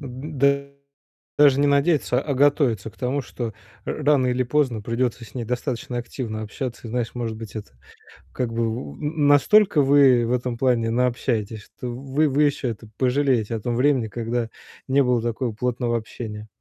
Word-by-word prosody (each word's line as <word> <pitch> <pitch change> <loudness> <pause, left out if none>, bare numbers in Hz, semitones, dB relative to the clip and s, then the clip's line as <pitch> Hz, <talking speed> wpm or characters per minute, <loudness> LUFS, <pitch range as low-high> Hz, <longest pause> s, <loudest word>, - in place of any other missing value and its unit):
д 140 +1 -1 0.6
даже 140 -2 +6
не 145 - +3
надеяться, 140 -3 +2
а 145 -3 -2
готовиться 130 - +2
к - - -26
тому, 135 +2 -1
что 120 -3 -6 0.3
р 150 - -4
рано 145 -3 +4
или 125 +1 +1
поздно 125 -4 0
придется 120 +1 -2
с - - -16
ней 120 - -3
достаточно 125 0 -3
активно 115 -2 -5
общаться. 120 +2 -6
И 110 - -7
знаешь, 120 -1 -2
может 115 -2 -3
быть, 110 -1 -9
это, 105 -11 -8 0.6
как 125 -2 -2
бы, 115 0 0
у 90 -11 -5
м, 150 - -1
настолько 150 +2 +5
вы 135 -3 +5
в - - -3
этом 125 -1 -1
плане 120 -3 +2
наобщаетесь, 115 -3 -1
что 125 - -9
вы 135 +5 0
вы 145 +2 +2
еще 140 -3 0
это 110 0 -7
пожалеете 125 -4 +1
о - - -5
том 120 +3 -2
времени, 130 -3 +2
когда 115 +1 -3 0.4
не 140 +1 +4
было 125 -2 +2
такого 120 +1 -2
плотного 120 +1 -1
общения. 110 -1 -7
125 Hz, 175 wpm, -23 LUFS, 115-140 Hz, 0.6 s, даже